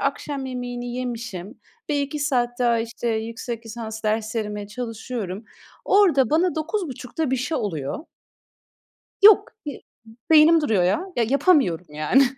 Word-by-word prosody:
akşam 275 -1 -2
yemeğini 245 -1 -5
yemişim 235 -4 -5 0.3
ve 290 - +1
2 285 +2 -3
saat 245 -4 0
daha, 235 -2 +3
işte, 230 +1 -3
yüksek 230 +1 -4
lisans 220 -1 -6
derslerime 215 -1 -2
çalışıyorum. 225 -3 -5 0.4
Orada 340 - +4
bana 340 +3 +2
21.30'da 315 - -3
bir 265 - +2
şey 285 +6 -2
oluyor. 165 - -4 1.2
Yok! 410 0 +7
Bir 285 - -4
b - - -14 0.5
beynim 315 +1 +7
duruyor 215 -11 +2
ya! 190 - +2
Ya 235 - +2
yapamıyorum, 265 - +3
yani, 155 - +3
245 Hz, 130 wpm, -23 LUFS, 220-285 Hz, 1.2 s, Yok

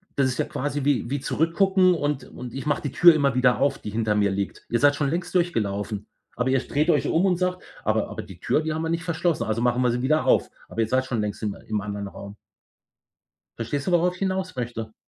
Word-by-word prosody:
das 135 -2 +3
ist 125 - -3
ja - - +2
quasi 145 0 -3
wie 130 -4 +1
wie 140 0 -1
zurückgucken 185 +5 +3
und 145 -5 -1
und: 125 -1 -9
„Ich 135 +2 -5
mache 145 -1 0
die 145 - -3
Tür 175 -1 +7
immer 140 -5 +1
wieder 125 -1 +3
auf, 140 0 +2
die 105 - -6
hinter 110 -1 0
mir 100 -1 +2
liegt.“ 100 0 -4
Ihr 120 - +1
seid 145 0 +5
schon 145 -2 0
längst 175 +2 -3
durchgelaufen, 105 - -1 0.3
aber 125 +1 0
ihr 135 0 +3
dreht 150 +5 -1
euch - - +3
um 175 +4 +2
und 180 -2 +2
sagt: 180 0 -1 0.2
„Aber - - +1
aber - - -5
die - - -13
Tür, 155 - +1
die 155 0 -2
haben 160 - -2
wir 160 - -2
nicht 165 0 -1
verschlossen, 170 -1 0
also 110 +1 -1
machen 125 +1 +2
wir 125 -1 +3
sie 125 +1 -1
wieder 155 +4 +2
auf.“ - - +3 0.2
Aber 115 - -2
ihr 110 - +1
seid 130 +2 +1
schon 120 -5 -1
längst 105 +1 -4
im 105 -2 -2
im 105 -2 -1
anderen 100 -1 -5
Raum. 100 +1 -10 1.2
Verstehst 140 +7 -3
du, - - +2
worauf 175 +1 +3
ich 185 - -14
hinaus 190 -2 -1
möchte? 115 -3 -5
135 Hz, 245 wpm, -24 LUFS, 115-165 Hz, 1.2 s, Tür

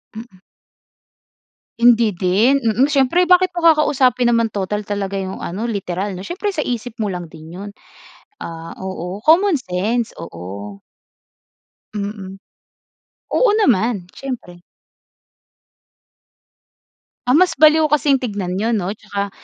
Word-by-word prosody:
Mm. 220 -5 -11 1.4
Hindi 235 -2 +5
din, 200 +9 +2
mm. 240 +3 +2
Siyempre, 280 +6 +3
bakit 365 +1 +4
mo 345 - -3
kakausapin 265 -6 +3
naman 230 -2 +2
total 210 +1 -3
talaga 200 -1 -3
'yong 190 -1 -4
ano 195 +6 -5
literal, 195 -1 -3
'no? 185 0 -7
Siyempre 400 +4 -3
sa 335 - -5
isip 240 -1 -4
mo 215 - 0
lang 175 -4 -5
din 160 -1 -12
'yon. 200 +2 -7 0.7
Ah, 165 0 -8
oo, 190 +1 -6
common 345 +2 +5
sense. 225 +1 -2
Oo. 100 +4 -8 1.2
Mm. 200 -2 -5 1.0
Oo, - - +4
naman, 225 - +2
siyempre. 205 -10 -7 2.6
Ah, 255 +5 +5
mas 365 0 +4
baliw 310 0 +5
kasing 290 -2 +3
tignan 200 -7 -3
yun, 225 +3 0
'no? 195 -3 -1
Tsaka 200 -1 -4
215 Hz, 120 wpm, -19 LUFS, 190-270 Hz, 2.6 s, Hindi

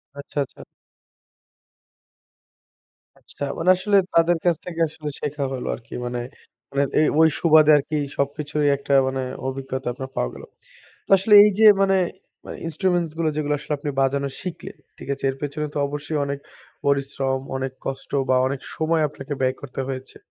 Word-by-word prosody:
আচ্ছা, 140 +1 -10
আচ্ছা। - - -16 2.6
আচ্ছা, - - -9
মানে 165 +2 +1
আসলে 200 +2 +2 0.2
তাদের 165 +1 +4
কাছ 175 -1 +4
থেকে 170 -2 -6
আসলে 155 -1 -7
শেখা 145 -1 -3
হলো 125 - -4
আরকি। 115 - -14
মানে 120 0 -3 0.5
মানে 140 0 +2 0.2
এ - - +5 0.2
ঐ - - +7 0.2
সুবাদে 155 -2 +6
আরকি 150 +2 -2 0.2
সবকিছুরই 145 +1 0
একটা 140 0 -2
মানে 130 0 -2 0.3
অভিজ্ঞতা 130 0 -4
আপনার 130 +1 -7
পাওয়া - - 0
গেল। - - -10 0.6
তো - - -20
আসলে 210 +3 +4
এইযে 210 +1 +4 0.2
মানে 195 0 +3 0.5
মা - - -9 0.2
ইন্সট্রুমেন্টস 175 -1 0
গুলো 165 -1 +1
যেগুলো 150 -1 0
আসলে 150 +1 -6
আপনি 145 +1 -3
বাজানো 140 +1 +1
শিখলেন, 180 -2 -7 0.2
ঠিক - - -10
আছে। 140 - -12
এর 135 - -8
পেছনে 150 +1 -3
তো - - -2
অবশ্যই 145 +2 -4
অনেক 140 0 -3 0.5
পরিশ্রম, 135 -1 0 0.2
অনেক 130 0 -3
কষ্ট 135 0 -5 0.2
বা 130 - +4
অনেক 135 0 -2 0.2
সময় 160 0 +1
আপনাকে 145 0 -8
ব্যয় 130 0 +2
করতে 135 -1 -6
হয়েছে। 130 -1 -6
145 Hz, 160 wpm, -23 LUFS, 135-160 Hz, 2.6 s, ঐ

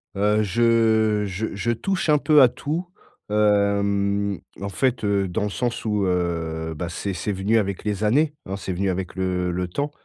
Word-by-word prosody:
Heu, 105 +2 +2
je 110 -1 +2
je 100 +3 -3
je 105 +4 -1
touche 185 - -1
un 150 - +6
peu 150 0 +5
à 130 - +9
tout, 155 +8 -4 0.4
hem, 100 -1 +1 0.2
en 100 - -4
fait, 125 +4 0
heu, 100 -2 +1
dans 90 +2 -2
le 105 - -1
sens 120 +2 -2
où 105 -2 +1
heu, 80 -3 -2
bah, 85 +2 -4
c'est 95 +3 -4
c'est 90 +4 -3
venu 100 +4 +1
avec 100 -3 -3
les 105 -1 -2
années, 145 +8 +2
hein, 95 +1 -4
c'est 95 -1 -4
venu 95 +2 -1
avec 90 -1 -3
le 90 -1 -1
le 90 +1 -2
temps, 145 +11 -3
100 Hz, 190 wpm, -23 LUFS, 95-115 Hz, 0.4 s, à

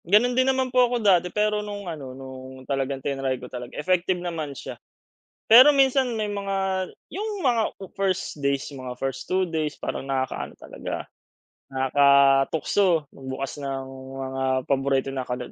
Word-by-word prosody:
Ganun 215 +8 +4
din 255 +1 +3
naman 260 -1 0
po 250 -1 +5
ako 245 - 0
dati 185 -6 +3
pero 210 +2 +1
nung 205 -1 -6
ano 140 -7 -7
nung 130 0 -10
talagang 135 -1 -2
tinry 135 -2 -1
ko 125 - -9
talaga 125 -1 -8
effective 180 +3 +1
naman 165 -6 -4
siya, - - -6 0.7
pero 255 +6 +9
minsan 270 -2 +3
may 215 - 0
mga 195 -2 -2 0.2
yung 420 +2 -3
mga, 240 -4 +3
ah, 195 -2 -12
1st 185 -6 -2
days, 140 0 0
mga 130 -2 -7
1st 135 0 -4
2 185 0 +2
days 155 -3 -2
parang 135 - -4
nakakaano 130 -1 -3
talaga, - - -6 0.6
nakakatukso 140 +6 +3
magbukas 135 +1 -6
ng 135 -1 -4 0.4
mga 130 0 -3 0.2
paborito 135 0 +1
na 130 -2 -4
kat 125 0 -4
155 Hz, 155 wpm, -25 LUFS, 135-205 Hz, 0.7 s, pero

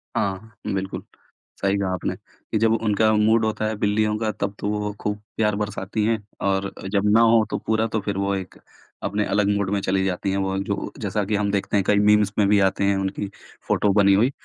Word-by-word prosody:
हाँ, 100 +3 -2 0.2
बिल्कुल। 95 0 -3 0.6
सही 100 0 +2
कहा 100 -1 -1
आपने, 90 - -2
कि - - -7
जब 110 0 +3
उनका 110 0 +2
मूड 110 +1 +3
होता 110 0 -1
है 110 - -2
बिल्लियों 105 +1 +1
का 110 -1 0
तब 100 0 -4
तो - - -3
वो 105 0 -2
खूब 105 0 -2 0.2
प्यार 105 -2 +2
बरसाती 105 0 -3
हैं 115 +1 +2 0.3
और 95 0 0 0.2
जब 100 0 +2
ना 115 - +6
हो 115 -1 +5
तो - - 0
पूरा 110 0 +2
तो 110 - +2
फिर 100 -2 -2
वो 100 0 0
एक 95 -1 -6 0.5
अपने 105 +1 0
अलग 100 +1 +1
मूड 100 -2 -1
में 100 - +1
चली 95 0 0
जाती 95 +1 -1
हैं। 95 - 0
वो 95 0 -1
जो 100 0 -3
जैसा 105 0 -1
कि 105 +1 -1
हम 100 0 0
देखते 100 +1 0
हैं 100 - +2
कई 100 +2 +3
मीम्स 105 -1 +4
में 100 - +4
भी 105 0 +4
आते 95 0 +2
हैं 100 - +3
उनकी 95 +1 -2 0.4
फोटो 105 - +2
बनी 100 -1 +5
हुई 115 +7 +3
105 Hz, 225 wpm, -23 LUFS, 100-105 Hz, 0.6 s, ना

